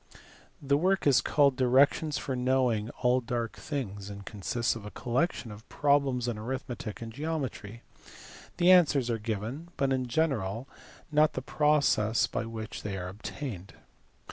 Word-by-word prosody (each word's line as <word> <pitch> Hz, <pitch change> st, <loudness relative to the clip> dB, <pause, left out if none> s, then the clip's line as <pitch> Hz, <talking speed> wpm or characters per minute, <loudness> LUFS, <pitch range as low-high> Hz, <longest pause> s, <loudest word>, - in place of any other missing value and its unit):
The 140 Hz, +1 st, +2 dB
work 190 Hz, +3 st, +1 dB
is 135 Hz, -4 st, +5 dB
called 140 Hz, -1 st, +3 dB
"directions 140 Hz, +4 st, +3 dB
for 135 Hz, -3 st, -3 dB
knowing 125 Hz, -4 st, +1 dB
all 125 Hz, +1 st, +4 dB
dark 120 Hz, -1 st, -3 dB
things," 105 Hz, -9 st, -5 dB
and 100 Hz, -1 st, -9 dB
consists 115 Hz, +4 st, -1 dB
of 115 Hz, -, -8 dB
a 105 Hz, -, -7 dB
collection 120 Hz, +1 st, -1 dB
of 105 Hz, +1 st, -12 dB
problems 140 Hz, -4 st, +2 dB
in 115 Hz, -3 st, -2 dB
arithmetic 120 Hz, -2 st, -5 dB
and 115 Hz, -1 st, -8 dB
geometry; 130 Hz, -7 st, -4 dB, 0.7 s
the 180 Hz, +1 st, +5 dB
answers 145 Hz, -9 st, +5 dB
are 115 Hz, -, -1 dB
given, 110 Hz, +8 st, -4 dB
but 135 Hz, -1 st, +1 dB
in 130 Hz, -1 st, -1 dB
general 120 Hz, -5 st, -1 dB, 0.4 s
not 155 Hz, +1 st, +4 dB
the 130 Hz, -, -4 dB
processes 140 Hz, -8 st, +2 dB
by 115 Hz, -, -3 dB
which 110 Hz, -1 st, -6 dB
they 100 Hz, -2 st, -4 dB
are 90 Hz, -1 st, -5 dB
obtained. 100 Hz, 0 st, -7 dB
125 Hz, 150 wpm, -29 LUFS, 110-140 Hz, 0.7 s, is